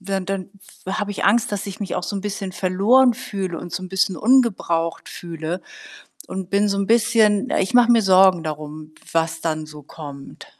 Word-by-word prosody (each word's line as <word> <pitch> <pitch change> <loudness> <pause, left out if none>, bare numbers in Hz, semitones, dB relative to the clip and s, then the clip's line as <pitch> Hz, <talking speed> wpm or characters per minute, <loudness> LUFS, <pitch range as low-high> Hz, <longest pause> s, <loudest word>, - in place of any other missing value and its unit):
dann 195 0 -3
dann 195 -1 -4 0.4
w 190 - -3
habe 205 -1 -2
ich - - -4
Angst, 215 +2 +2
dass 205 0 -3
ich 195 - -7
mich 200 - -4
auch 180 - -2
so 205 - -4
'n 195 - -5
bisschen 200 -2 -4
verloren 210 +9 +3
fühle 190 -6 -5
und 175 - -8
so - - -4
'n 185 - -7
bisschen 190 -1 +1
ungebraucht 195 -8 +1
fühle 170 +1 -6 0.7
und 190 -1 -5
bin 200 +1 +2
so 200 0 -1
'n 200 - -1
bisschen 225 0 +3
ich 195 +5 -1
mache 245 -1 +6
mir 230 - +4
Sorgen 190 -3 +5
darum, 155 0 -7 0.2
was 165 0 0
dann 155 -1 -2
so 150 -1 -12
kommt. 140 -1 -11
190 Hz, 200 wpm, -21 LUFS, 165-205 Hz, 0.7 s, mache